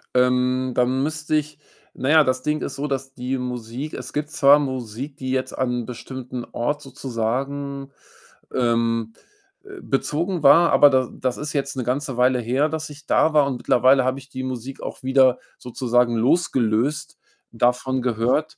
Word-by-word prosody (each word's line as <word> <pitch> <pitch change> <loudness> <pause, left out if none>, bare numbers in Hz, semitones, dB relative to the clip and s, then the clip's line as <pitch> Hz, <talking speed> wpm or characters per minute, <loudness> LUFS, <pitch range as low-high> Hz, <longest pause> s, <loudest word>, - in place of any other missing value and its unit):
Ähm, 125 0 +2
dann 125 +2 +1
müsste 155 +1 -1
ich 150 0 -3 0.4
na 130 - -3
ja, 160 0 +7
das 130 -2 -1
Ding 150 0 -1
ist - - -4
so, 145 - -3
dass 135 -1 -4
die 130 +1 -3
Musik 125 +3 -5
es - - -7
gibt 150 0 -3
zwar 145 -3 +6
Musik, 130 0 -5
die 130 -1 -5
jetzt 130 0 -2
an 125 -1 -1
'n - - -10
bestimmten 125 +1 -7
Ort 145 +5 -1
sozusagen 135 +1 -4 0.6
ähm, 115 -2 0 0.5
äh, 390 -2 -11
bezogen 165 +6 -1
war. 165 +4 +6
Aber 145 - +7
da 130 -2 +1
das 130 -1 -3
ist 150 +1 -4
jetzt 140 -1 -2
'ne 130 - -2
ganze 130 +1 -2
Weile 125 0 +3
her, 130 +6 0
dass 155 0 -4
ich 150 +1 -13
da 160 - +2
war, 150 -2 +5
und 135 -3 -2
mittlerweile 130 +2 +4
habe 130 +1 0
ich 135 0 -16
die 130 0 -6
Musik 130 +1 -6
auch - - -7
wieder 130 -1 +4 0.2
sozusagen 125 -1 0
losgelöst 125 0 +1 0.3
davon 125 +2 0
gehört, 125 +5 0
130 Hz, 170 wpm, -22 LUFS, 125-145 Hz, 0.6 s, ja